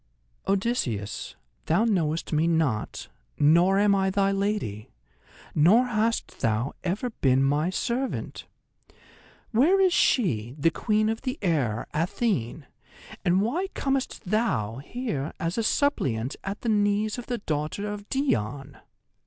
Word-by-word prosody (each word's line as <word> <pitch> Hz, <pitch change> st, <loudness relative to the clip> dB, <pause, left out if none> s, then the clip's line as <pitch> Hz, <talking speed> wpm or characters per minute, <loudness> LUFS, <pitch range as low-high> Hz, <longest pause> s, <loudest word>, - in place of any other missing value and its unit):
"Odysseus, 190 Hz, -, -1 dB, 0.3 s
thou 185 Hz, +8 st, +3 dB
knowest 165 Hz, -8 st, 0 dB
me 155 Hz, +2 st, +2 dB
not, 160 Hz, -10 st, 0 dB, 0.3 s
nor 170 Hz, +6 st, +4 dB
am 205 Hz, 0 st, +4 dB
I 190 Hz, -1 st, +2 dB
thy 195 Hz, 0 st, +2 dB
lady, 195 Hz, -, -2 dB, 0.6 s
nor 190 Hz, +12 st, +5 dB
hast 230 Hz, -1 st, -1 dB
thou 115 Hz, +3 st, 0 dB
ever 205 Hz, +7 st, -2 dB
been 135 Hz, -9 st, +2 dB
my 145 Hz, +5 st, +2 dB
servant! 240 Hz, +7 st, -3 dB, 1.0 s
Where 300 Hz, -, +4 dB
is 375 Hz, -2 st, +4 dB
she, 125 Hz, -, +2 dB
the 165 Hz, +3 st, +2 dB
Queen 215 Hz, +2 st, +1 dB
of 225 Hz, +1 st, -2 dB
the 260 Hz, +1 st, -3 dB
Air, 135 Hz, -, 0 dB
Athene, 160 Hz, -, -1 dB, 0.6 s
and 180 Hz, +3 st, +3 dB
why 330 Hz, -, -1 dB
comest 270 Hz, -1 st, -1 dB
thou 180 Hz, -, 0 dB
here 155 Hz, -, -4 dB
as 165 Hz, +1 st, -2 dB
a -, -, +2 dB
suppliant 135 Hz, -, 0 dB
at 195 Hz, +1 st, -5 dB
the 235 Hz, -, -1 dB
knees 210 Hz, +1 st, +1 dB
of 240 Hz, -, -9 dB
the 245 Hz, -, -2 dB
daughter 155 Hz, 0 st, -3 dB
of 205 Hz, 0 st, -6 dB
Dione?" 140 Hz, -, -1 dB
195 Hz, 130 wpm, -26 LUFS, 145-225 Hz, 1.0 s, nor